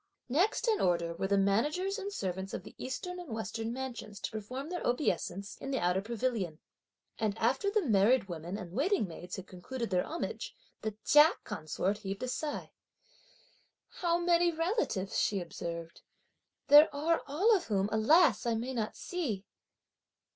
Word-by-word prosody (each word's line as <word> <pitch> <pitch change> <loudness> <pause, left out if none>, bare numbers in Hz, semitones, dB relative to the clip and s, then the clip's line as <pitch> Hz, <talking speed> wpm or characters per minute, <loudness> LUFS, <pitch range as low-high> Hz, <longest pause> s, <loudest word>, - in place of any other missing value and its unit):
Next 360 - +2
in 435 -3 +2
order, 170 -2 +1
were 190 +3 -2
the 200 0 +2
managers 295 - +1
and 400 0 -4
servants 190 - -3
of - - -6
the - - -11
eastern 360 +8 -4
and 350 -4 -9
western 225 +1 -3
mansions 240 -5 -6
to - - -3
perform 250 +7 -5
their 355 - -3
obeisance 200 - -1
in 270 - -6
the 270 - 0
outer 180 -2 +1
pavilion; 225 -6 -2 0.6
and 215 -1 0
after 265 - +1
the 420 0 +1
married 225 +2 +4
women 175 +2 -5
and 185 -5 -8
waiting 280 - +1
maids 175 +1 -7
had 190 - -7
concluded 230 +6 -6
their 180 -1 +2
homage, 335 - -4 0.3
the 220 -1 -3
Chia 300 +3 +7
consort 185 +6 -2
heaved 195 +1 -5
a - - -1
sigh. 295 +4 -3 1.2
"How 340 -1 0
many 345 0 +3
relatives," 330 - -1
she 200 - +1
observed, 170 -1 -6 0.7
"there 295 +2 +9
are 325 +3 +1
all 390 +11 +4
of 375 - -1
whom, 200 -2 +1
alas! 240 +5 +4
I 230 - +2
may 240 +4 -3
not 220 -3 -3
see." 250 - -3
230 Hz, 160 wpm, -32 LUFS, 195-315 Hz, 1.2 s, there